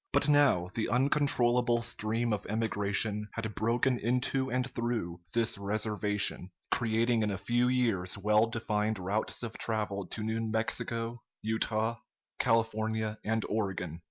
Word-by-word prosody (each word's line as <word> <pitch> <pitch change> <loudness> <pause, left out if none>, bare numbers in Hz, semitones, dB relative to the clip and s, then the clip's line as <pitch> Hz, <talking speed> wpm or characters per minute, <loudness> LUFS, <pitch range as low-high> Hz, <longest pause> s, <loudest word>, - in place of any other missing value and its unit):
But - - +4
now 140 -12 +4
the 110 - -1
uncontrollable 125 -2 +3
stream 115 0 -1
of 105 -1 -3
emigration 105 -1 0
had 110 -2 -4
broken 120 +4 +1
into 125 +3 0
and 125 +1 0
through 115 -9 -3
this 115 -4 +1
reservation, 105 -2 0 0.2
creating 115 0 +2
in 105 - +1
a 100 - -2
few 120 +5 +1
years 115 -8 +1
well 105 +3 +3
defined 110 -1 -1
routes 100 +6 -2
of 115 -2 -6
travel 105 -4 -1
to 110 - -5
New 110 +1 -1
Mexico, 115 +1 -2 0.2
Utah, 110 +1 0 0.4
California, 110 -1 0
and 110 +1 0
Oregon. 95 -6 -2
110 Hz, 130 wpm, -31 LUFS, 105-120 Hz, 0.4 s, But